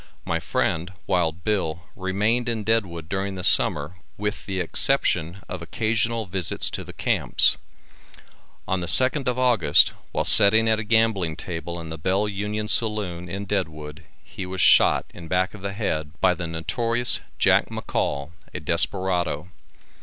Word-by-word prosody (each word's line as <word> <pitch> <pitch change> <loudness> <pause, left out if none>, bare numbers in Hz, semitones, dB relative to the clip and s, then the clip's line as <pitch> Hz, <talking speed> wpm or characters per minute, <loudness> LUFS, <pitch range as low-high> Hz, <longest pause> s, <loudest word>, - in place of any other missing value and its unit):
My - - -1
friend, 85 +4 -2
Wild 85 -2 -1
Bill, 85 -6 -2
remained 105 +6 -1
in 115 -2 -2
Deadwood 95 -7 -1
during 95 +1 -3
the 90 - -6
summer 75 +2 +2 0.2
with 105 0 -4
the 95 -1 -3
exception 90 - +1
of 90 - -7
occasional 115 +4 -1
visits 95 -2 -2
to - - -5
the - - -10
camps. - - +3 1.1
On 95 - 0
the 85 - -4
2nd 130 - +3
of 125 0 0
August, 120 - +4 0.2
while - - -1
setting 110 +3 +7
at 110 -1 +2
a - - -3
gambling 105 -7 +1
table 85 +1 -6
in 80 -1 -8
the 80 0 -7
Bell 95 +6 0
Union 105 +1 -4
saloon, 100 -7 0
in 100 +3 -5
Deadwood, 80 -6 -4 0.2
he 100 - -8
was 95 0 -6
shot - - +5
in 85 - -11
the - - -12
back 90 +1 0
of 105 - -11
the 100 0 -4
head 80 -8 -3
by 95 -1 +3
the 85 -1 -5
notorious 115 +9 0 0.2
Jack - - +3
McCall, 70 +2 -3 0.2
a - - -3
desperado. 90 -4 -1
95 Hz, 160 wpm, -23 LUFS, 85-110 Hz, 1.1 s, setting